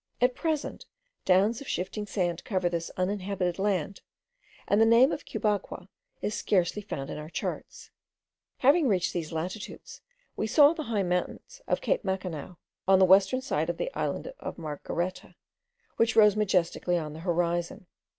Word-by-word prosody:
At 250 +1 +3
present, 310 +1 -3 0.4
downs 200 +6 +3
of 280 - -9
shifting 205 +3 -3
sand 175 -4 -1
cover 185 -4 0
this 170 -1 -3
uninhabited 185 -1 -1
land, 195 -2 -1 0.7
and 205 +2 +3
the - - +7
name 235 +4 +6
of - - -4
Cubagua 205 -3 -2 0.3
is 210 - -1
scarcely 205 -1 0
found 140 -9 -5
in - - -5
our 150 +1 -8
charts. - - -6 0.7
Having 285 +3 +4
reached 190 -5 +1
these 165 -3 -3
latitudes, 180 +6 -6 0.3
we 215 - -2
saw 285 +6 +6
the 315 -3 -5
high 210 -4 +1
mountains 180 - -3
of - - 0
Cape - - 0
Macanao, 185 -4 -4 0.3
on 190 0 +6
the 190 - +6
western 195 +7 +4
side 275 - -1
of - - -2
the - - -3
island - - -3
of - - -6
Margareta, 170 +3 -4 0.6
which 230 0 +2
rose 210 -2 +6
majestically 180 -3 +1
on 155 -3 -4
the 155 - -9
horizon. 175 0 -1
190 Hz, 160 wpm, -28 LUFS, 175-220 Hz, 0.7 s, the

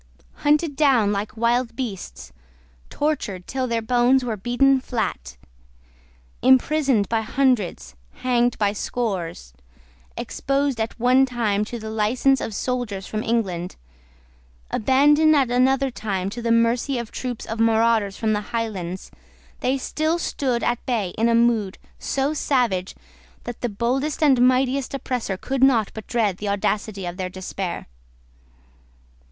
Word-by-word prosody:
Hunted 295 0 +2
down 260 -8 +3
like 210 +4 -3
wild 235 +1 +1
beasts, 70 - -6 0.6
tortured 250 -12 -2
till 260 -1 -2
their 230 -1 -1
bones 245 +2 +3
were 230 -3 -2
beaten 245 +6 +2
flat, 65 - -4 1.0
imprisoned 260 -3 +3
by 225 -1 0
hundreds, 250 -4 0 0.2
hanged 245 -1 +1
by 205 -1 +1
scores, 185 - -4 0.6
exposed 275 -3 -1
at 225 +2 -4
one 255 +3 +4
time 220 -5 0
to 235 - -6
the 220 -1 -7
license 240 +5 +2
of 215 - -4
soldiers 235 -7 -3
from 215 - -3
England, 195 -7 -2 1.0
abandoned 295 +6 +4
at 265 -4 +2
another 265 +2 +2
time 195 -4 -3
to 240 - -6
the 230 0 0
mercy 235 +3 +2
of 235 -2 -5
troops 250 -3 -5
of 225 +1 -5
marauders 225 -3 +2
from 220 -1 0
the 210 - 0
Highlands, 190 -6 -4 0.5
they 260 +2 0
still 310 +5 -1
stood 260 -7 -1
at 240 0 0
bay 225 -7 0
in 225 +6 0
a 230 - +3
mood 230 -5 +2 0.2
so 275 +2 -1
savage 240 -11 0 0.5
that 240 - -7
the 245 - -1
boldest 260 +9 -1
and 270 -5 +5
mightiest 260 +1 +1
oppressor 250 -7 -3
could 265 +6 -1
not 235 -6 +4
but 220 - -9
dread 215 -6 0
the 205 0 -4
audacity 200 0 -1
of 175 0 -5
their 185 -1 -3
despair. 185 0 -5
235 Hz, 140 wpm, -23 LUFS, 210-260 Hz, 1.0 s, and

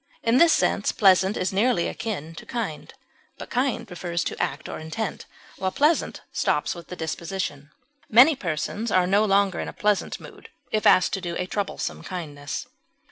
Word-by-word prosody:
In 230 +1 +3
this 335 -1 +7
sense - - +2
pleasant 190 0 +4
is 185 - -1
nearly 200 -3 +2
akin 165 -8 -4
to - - -10
kind, 220 -11 -4 0.5
but - - -9
kind 250 -2 0
refers 175 -1 -3
to - - -3
act 140 +2 -2
or - - -6
intent, 160 +7 -5 0.3
while 190 0 0
pleasant 300 - +1
stops - - +1
with 170 -1 -11
the 180 - -7
disposition; 160 -3 -4 0.4
many 255 +8 +7
persons 205 - -3
are 185 -2 +3
no 200 +3 +3
longer 200 -2 +2
in - - -3
a - - -6
pleasant 210 -1 0
mood - - -13 0.2
if 215 -1 +2
asked 185 - +5
to 195 - -1
do 175 -2 -4
a 180 - -2
troublesome 200 +1 -3
kindness. 145 -6 -6
190 Hz, 175 wpm, -25 LUFS, 170-215 Hz, 0.5 s, this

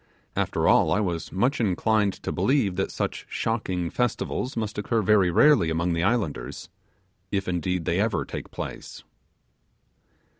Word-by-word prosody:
After - - 0
all, 80 - +4
I 95 - +3
was 85 -6 -2
much 125 +8 +1
inclined 105 0 +2
to - - -2
believe 125 -9 +1
that 95 - -1
these - - -3
shocking 95 -7 -2
festivals 125 +1 -2
must 110 -2 -2
occur 110 +1 0
very 100 -2 +4
rarely 115 - +5
among 85 +2 0
the 85 - 0
islanders, 100 -5 -1 0.6
if, 100 -1 -1
indeed, 90 -1 -1
they 85 - +1
ever 105 -3 0
take - - -7
place. - - -7
100 Hz, 145 wpm, -25 LUFS, 90-115 Hz, 0.6 s, rarely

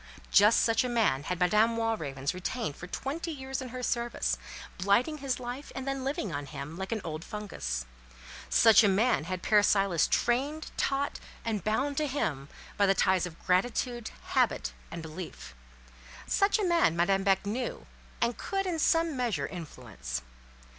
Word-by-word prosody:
Just 210 +3 +6
such 225 +1 +3
a 250 - -2
man 205 - +1
had 180 -1 -2
Madame 215 +6 +3
Walravens 155 -12 -1
retained 185 - -3
for 175 - -9
twenty 290 - -4
years 265 -3 -4
in 255 - -6
her 250 +1 -6
service, 240 -1 -1 0.4
blighting 235 - +2
his 270 -3 -2
life, 250 +3 -6
and 265 0 -5
then 275 -1 -2
living 260 - -2
on 145 0 -4
him, 140 +2 -7
like 190 +1 -5
an 220 -2 -1
old 155 0 -5
fungus; 65 - -4 0.6
such 225 0 +7
a - - +5
man 200 -2 +2
had 185 0 -4
Père 210 -1 +5
Silas 195 -6 +3
trained, 280 +6 0
taught, 275 +1 -1 0.3
and 215 -5 -1
bound 270 +8 0
to 305 - +1
him 145 - -2 0.3
by 200 -1 +4
the 195 - +4
ties 185 -1 +2
of 165 -2 -11
gratitude, 240 +5 0 0.2
habit, - - +1 0.2
and 165 - -7
belief. 155 - -8 0.7
Such 400 +2 +3
a 425 - -1
man 340 - +3
Madame 195 +3 +2
Beck 195 0 +2
knew, 240 +5 -3 0.4
and 235 0 +2
could 390 0 -2
in 345 -3 -1
some 330 0 +2
measure 230 - 0
influence. 110 - -6
215 Hz, 165 wpm, -29 LUFS, 175-255 Hz, 0.7 s, such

